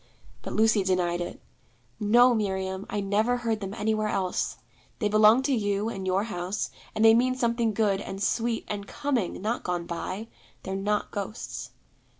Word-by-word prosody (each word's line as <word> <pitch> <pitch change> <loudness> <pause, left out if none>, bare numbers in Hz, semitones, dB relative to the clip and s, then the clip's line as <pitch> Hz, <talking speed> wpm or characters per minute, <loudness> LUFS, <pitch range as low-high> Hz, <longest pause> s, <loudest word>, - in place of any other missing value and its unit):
But - - -6
Lucy 220 -2 +4
denied 175 -2 +1
it. 175 - -5 0.6
'No, 240 +4 +5
Miriam, 190 -2 -2
I 205 - -1
never 215 +5 +1
heard 230 -3 -1
them 195 0 -5
anywhere 215 -1 0
else. 185 -3 -1 0.4
They 210 - 0
belong 215 +4 +6
to 275 - +1
you 205 -2 0
and 190 -4 -5
your 190 +2 +2
house, 190 -2 -3 0.2
and 220 - +3
they 225 - +9
mean 255 +2 +3
something 235 -2 +1
good, 205 -2 +1
and 195 -1 -6
sweet, 225 +3 0
and 200 -1 -4
coming, 270 -9 -1
not 230 +3 -1
gone 175 -1 -2
by. 185 +5 -4 0.4
They're 190 - -3
not 205 +2 -1
ghosts.' 205 +3 -5
210 Hz, 165 wpm, -27 LUFS, 195-225 Hz, 0.6 s, they